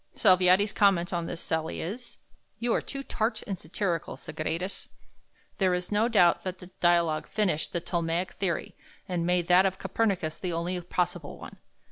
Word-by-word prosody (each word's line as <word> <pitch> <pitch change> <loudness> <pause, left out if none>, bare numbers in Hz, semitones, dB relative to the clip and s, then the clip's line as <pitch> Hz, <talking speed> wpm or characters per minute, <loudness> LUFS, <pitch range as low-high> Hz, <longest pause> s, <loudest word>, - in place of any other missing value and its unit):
Salviati's 185 0 +5
comment 195 -3 +3
on 170 -1 -1
this 165 - -5
sally 160 0 -2
is, 230 +9 -6 0.4
"You 235 0 0
are - - +1
too 275 0 -5
tart 220 -3 -1
and 195 - -3
satyrical, 170 0 -3
Sagredus." 170 +5 -4 0.7
There 185 -2 +3
is 180 +2 -4
no 210 +2 +3
doubt 180 -7 +4
that 185 -1 -4
the 180 0 -13
"Dialogue" 170 -3 +2
finished 185 -8 0
the 170 - -2
Ptolemaic 170 +1 -1
theory, 185 -5 -2 0.3
and 175 -2 -1
made 180 -1 +2
that 185 +2 +6
of 190 0 -3
Copernicus 190 -8 -1
the 180 -2 -3
only 175 +2 -2
possible 175 -3 -2
one. - - -11
180 Hz, 165 wpm, -28 LUFS, 170-195 Hz, 0.7 s, that